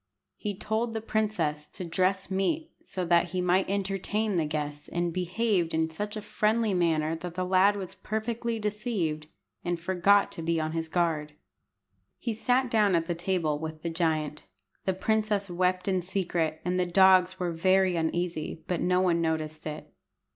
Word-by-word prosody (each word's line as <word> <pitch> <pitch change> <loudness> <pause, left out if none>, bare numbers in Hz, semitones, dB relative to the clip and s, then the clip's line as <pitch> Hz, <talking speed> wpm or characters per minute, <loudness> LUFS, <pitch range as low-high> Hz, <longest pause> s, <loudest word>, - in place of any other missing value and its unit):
He 205 -3 -4
told 225 +3 -1
the - - 0
princess 205 -10 -1
to 185 - -7
dress 185 +3 0
meat, 305 - 0
so 185 -1 -3
that 170 0 +4
he 185 - 0
might 180 +1 +2
entertain 200 +2 -1
the 160 -3 +1
guest, 150 -1 -4
and 175 -1 -1
behaved 180 -1 0
in 160 0 +1
such 210 +6 -4
a 215 - -6
friendly 215 0 +1
manner 165 -3 +1
that 175 +1 -7
the 185 0 -1
lad 190 +2 +4
was 190 -3 -5
perfectly 230 +2 -3
deceived, 205 -8 -2 0.4
and 175 -1 -1
forgot 190 +3 +3
to - - -5
be 165 0 0
on 155 0 -1
his 165 0 -2
guard. 160 -3 0 0.8
He 235 - -3
sat 250 +3 +1
down 210 -4 +4
at 165 -1 +1
the 175 - -1
table 170 -4 0
with 160 0 -6
the 170 - -2
giant. 155 -3 -1 0.4
The 190 - +1
princess 210 -1 0
wept 180 +1 0
in 185 -2 +1
secret, 175 -4 -1
and 180 +1 0
the 180 - +1
dogs 185 0 +5
were 180 -2 -1
very 185 +2 +3
uneasy, 165 -1 -2
but 180 -2 -1
no 180 +1 +3
one 170 -2 +2
noticed 155 -1 -2
it. 155 0 -7
180 Hz, 175 wpm, -28 LUFS, 165-200 Hz, 0.8 s, dogs